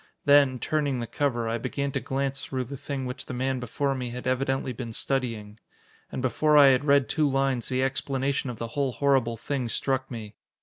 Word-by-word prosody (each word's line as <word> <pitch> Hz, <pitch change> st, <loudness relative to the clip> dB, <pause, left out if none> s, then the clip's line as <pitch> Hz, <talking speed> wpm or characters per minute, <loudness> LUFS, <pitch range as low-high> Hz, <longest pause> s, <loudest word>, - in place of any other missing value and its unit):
Then, 140 Hz, -3 st, +5 dB
turning 145 Hz, -1 st, 0 dB
the 120 Hz, -, -2 dB
cover, 120 Hz, -1 st, -1 dB
I 115 Hz, +1 st, -1 dB
began 140 Hz, +4 st, -2 dB
to -, -, -1 dB
glance 135 Hz, 0 st, -2 dB
through 130 Hz, -1 st, -3 dB
the 135 Hz, +3 st, -7 dB
thing 135 Hz, 0 st, -4 dB
which 125 Hz, 0 st, -6 dB
the 125 Hz, -, -5 dB
man 130 Hz, +1 st, -1 dB
before 135 Hz, +3 st, -1 dB
me 125 Hz, -2 st, -4 dB
had 125 Hz, +1 st, -7 dB
evidently 130 Hz, 0 st, 0 dB
been 115 Hz, -1 st, -6 dB
studying. 115 Hz, -5 st, -2 dB, 0.5 s
And 130 Hz, -, -4 dB
before 150 Hz, +5 st, +3 dB
I 140 Hz, -2 st, +9 dB
had 135 Hz, +2 st, +3 dB
read 140 Hz, -2 st, +4 dB
two 150 Hz, -2 st, +2 dB
lines, 135 Hz, -2 st, 0 dB
the 130 Hz, 0 st, +1 dB
explanation 135 Hz, 0 st, -1 dB
of 120 Hz, -, -6 dB
the 115 Hz, +1 st, -5 dB
whole 135 Hz, +1 st, -1 dB
horrible 130 Hz, -2 st, +2 dB
thing 130 Hz, 0 st, -3 dB
struck 130 Hz, +2 st, -1 dB
me. 110 Hz, -4 st, -7 dB
130 Hz, 205 wpm, -27 LUFS, 125-140 Hz, 0.5 s, I